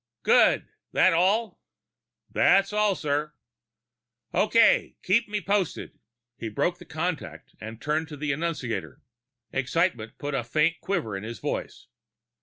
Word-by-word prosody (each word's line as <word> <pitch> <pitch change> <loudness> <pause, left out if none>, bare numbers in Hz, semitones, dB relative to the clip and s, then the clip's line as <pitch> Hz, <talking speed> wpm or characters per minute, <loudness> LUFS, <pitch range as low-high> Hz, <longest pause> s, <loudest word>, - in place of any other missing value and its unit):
'" - - -62
"Good. - - +4 0.3
That 185 - +5
all?" 200 +7 +1 0.7
"That's 195 +1 +3
all, 210 -2 +2
sir." 150 -1 -2 1.0
"Okay. 230 +2 +4
Keep 210 +5 +2
me 210 0 -2
posted." 200 -4 -2 0.4
He 115 - -4
broke 105 - -1
contact - - -4
and 110 +1 -8
turned 155 +3 -1
to 150 - -9
the 145 0 -2
annunciator. 150 -6 -3 0.5
Excitement 130 -5 -1
put 145 0 -4
a 135 -3 0
faint 155 +8 +1
quiver 170 - -2
in 95 - -4
his 115 +1 -6
voice. - - -4
160 Hz, 130 wpm, -26 LUFS, 135-195 Hz, 1.0 s, That